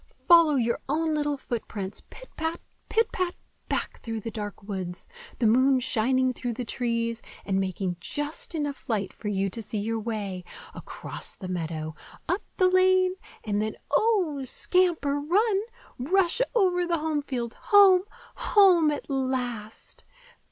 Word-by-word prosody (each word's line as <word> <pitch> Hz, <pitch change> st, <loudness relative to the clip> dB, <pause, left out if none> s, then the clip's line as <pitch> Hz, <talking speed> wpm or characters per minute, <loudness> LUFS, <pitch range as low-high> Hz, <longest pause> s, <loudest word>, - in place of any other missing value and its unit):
Follow 335 Hz, -4 st, +7 dB
your 235 Hz, -3 st, +1 dB
own 315 Hz, +2 st, +1 dB
little 295 Hz, -1 st, 0 dB
footprints, 215 Hz, -6 st, -5 dB
pit -, -, -12 dB
pat, 320 Hz, +1 st, -2 dB, 0.3 s
pit 455 Hz, 0 st, +2 dB
pat, 365 Hz, -1 st, -1 dB, 0.3 s
back -, -, -2 dB
through 225 Hz, -1 st, -4 dB
the 225 Hz, +2 st, -6 dB
dark 210 Hz, -2 st, -6 dB
woods,—the 205 Hz, -, -6 dB
moon 260 Hz, +4 st, +5 dB
shining 255 Hz, +1 st, +1 dB
through 245 Hz, -1 st, -3 dB
the 245 Hz, +2 st, -5 dB
trees, 230 Hz, -1 st, -2 dB, 0.2 s
and 195 Hz, -1 st, +1 dB
making 190 Hz, -1 st, -2 dB
just 295 Hz, -, -4 dB
enough 290 Hz, -4 st, -4 dB
light 205 Hz, -4 st, -1 dB
for 210 Hz, -, -8 dB
you 195 Hz, -1 st, 0 dB
to 225 Hz, +4 st, -5 dB
see 215 Hz, -, -4 dB
your 225 Hz, +2 st, -1 dB
way,—across 205 Hz, -5 st, -6 dB
the 185 Hz, -, -8 dB
meadow, 160 Hz, -3 st, -3 dB, 0.3 s
up 360 Hz, +4 st, 0 dB, 0.2 s
the 370 Hz, -, +5 dB
lane 370 Hz, 0 st, +4 dB, 0.3 s
and 210 Hz, -1 st, 0 dB
then,—oh! 345 Hz, -, +1 dB
then 270 Hz, -, -4 dB
scamper, 325 Hz, -3 st, +2 dB
run! 390 Hz, +7 st, +2 dB, 0.4 s
rush 365 Hz, -, +2 dB
over 360 Hz, -5 st, +3 dB
the 340 Hz, -1 st, +1 dB
home 310 Hz, -1 st, -1 dB
field, 245 Hz, -5 st, -4 dB
home! 395 Hz, -4 st, +6 dB, 0.3 s
home 365 Hz, -7 st, +5 dB
at 295 Hz, -1 st, -3 dB
last! 250 Hz, -5 st, -3 dB
265 Hz, 145 wpm, -27 LUFS, 220-345 Hz, 0.4 s, Follow